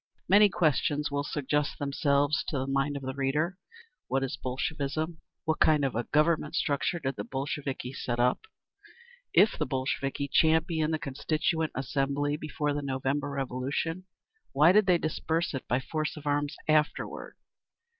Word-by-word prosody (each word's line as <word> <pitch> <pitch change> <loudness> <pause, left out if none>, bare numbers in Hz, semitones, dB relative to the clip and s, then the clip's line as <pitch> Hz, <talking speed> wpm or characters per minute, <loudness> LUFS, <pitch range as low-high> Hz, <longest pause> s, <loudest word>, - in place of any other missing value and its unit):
Many 205 +2 +7
questions 150 -3 +1
will 140 0 -1
suggest 145 0 -1
themselves 140 0 +1
to 145 - -2
the 130 - -1
mind 135 +1 0
of 140 - -8
the 130 0 -3
reader. 150 +7 -1 0.5
What 135 +1 0
is 135 - -2
Bolshevism? 155 +4 -3 0.2
What 160 -1 0
kind 150 -3 +4
of 135 - -1
a 120 +1 -1
governmental 150 0 +2
structure 145 +4 0
did 135 -4 -3
the - - -3
Bolsheviki 135 -1 -4
set 120 -2 -3
up? 125 - +1 0.8
If 220 - +4
the - - 0
Bolsheviki 135 +1 -2
championed 160 +1 +2
the - - -1
Constituent 155 +3 -1
Assembly 140 +2 0
before 150 -1 -2
the 145 - -2
November 140 +1 -1
Revolution, 140 +6 -3 0.5
why 150 +5 +6
did 210 +1 +4
they 180 -2 +5
disperse 160 +1 -1
it 135 - -5
by 125 - +1
force 155 +4 -3
of 150 - -10
arms 145 0 0
afterward? 155 0 0
145 Hz, 155 wpm, -29 LUFS, 135-155 Hz, 0.8 s, Many